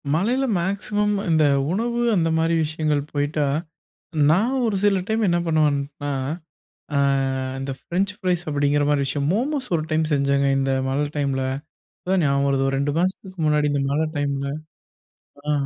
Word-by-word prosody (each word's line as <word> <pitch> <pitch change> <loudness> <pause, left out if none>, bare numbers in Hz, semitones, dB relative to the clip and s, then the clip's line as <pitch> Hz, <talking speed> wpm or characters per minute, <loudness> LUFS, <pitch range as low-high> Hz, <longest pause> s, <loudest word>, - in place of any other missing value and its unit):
மழையில 240 - +1
மேக்சிமம், 205 +3 0
இந்த 160 -1 +4 0.3
உணவு 235 +5 -1 0.2
அந்த 165 -3 +2
மாரி 165 +1 +2
விஷயங்கள் 155 -1 0
போயிட்டா. 145 0 0 0.8
நான் 220 +11 +2
ஒரு 215 -3 0
சில 200 -2 +3
டைம் 220 +1 +1
என்ன 175 0 +2
பண்ணுவேன்னா? 145 -2 0 0.9
ஆ, - - +4 0.6
அந்த 135 +1 -4
ஃப்ரென்ச் 190 +7 -1
பிரைஸ் 180 -2 +1
அப்டிங்கற 145 0 +1
மாரி 145 -1 +2
விஷயம். 140 +1 -1
மோமோஸ் 260 +5 -1
ஒரு 160 - +1
டைம் 155 0 +2
செஞ்சங்க. 140 0 +2
இந்த 135 0 +1 0.2
மழை 140 +2 0
டைம்ல. 140 -2 0 0.6
இப்ப - - -25
தான் 190 -1 +3
நியாபகம் 140 -1 +2
வருது, 135 -1 +1
ஒரு 135 - 0
2 140 +1 0
மாசத்துக்கு 185 +1 -2
முன்னாடி 150 -1 +2
இந்த 140 -1 0
மழை 150 +3 +1
டைம்ல 140 -1 -1 1.1
அ. - - +3
155 Hz, 155 wpm, -23 LUFS, 140-190 Hz, 1.1 s, இந்த